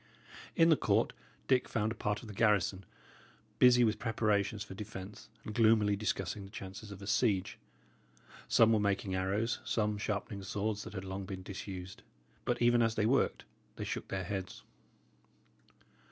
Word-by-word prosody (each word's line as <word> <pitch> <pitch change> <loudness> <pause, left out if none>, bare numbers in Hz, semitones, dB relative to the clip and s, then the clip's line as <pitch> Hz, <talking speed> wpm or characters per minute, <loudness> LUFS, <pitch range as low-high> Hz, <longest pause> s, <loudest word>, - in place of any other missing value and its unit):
In 165 0 +5
the 160 - +7
court, - - +1 0.3
Dick 130 -2 +2
found 110 0 0
a - - -4
part 105 +1 -2
of - - -9
the 105 - -8
garrison, 100 -3 +2 0.7
busy 125 -1 +7
with 110 -2 +1
preparations 105 -1 0
for 100 - -9
defence, 100 0 -8 0.2
and 105 - -5
gloomily 110 -3 +4
discussing 105 0 -2
the 95 - -10
chances 100 0 -8
of 100 0 -9
a - - -6
siege. 100 -2 +1 0.9
Some 115 0 +5
were 110 - +3
making 100 -1 0
arrows, 100 +5 0
some 105 -2 0
sharpening 100 -1 -3
swords 105 +2 -2
that - - -8
had 95 -2 -5
long 95 +1 -5
been 95 -2 -6
disused; 95 -1 -7 0.4
but 120 0 0
even 120 0 +5
as 115 -1 +2
they 105 - +1
worked, 135 +5 +1 0.3
they - - -5
shook - - -4
their 95 -1 -3
heads. 95 0 -5
105 Hz, 165 wpm, -33 LUFS, 95-110 Hz, 0.9 s, the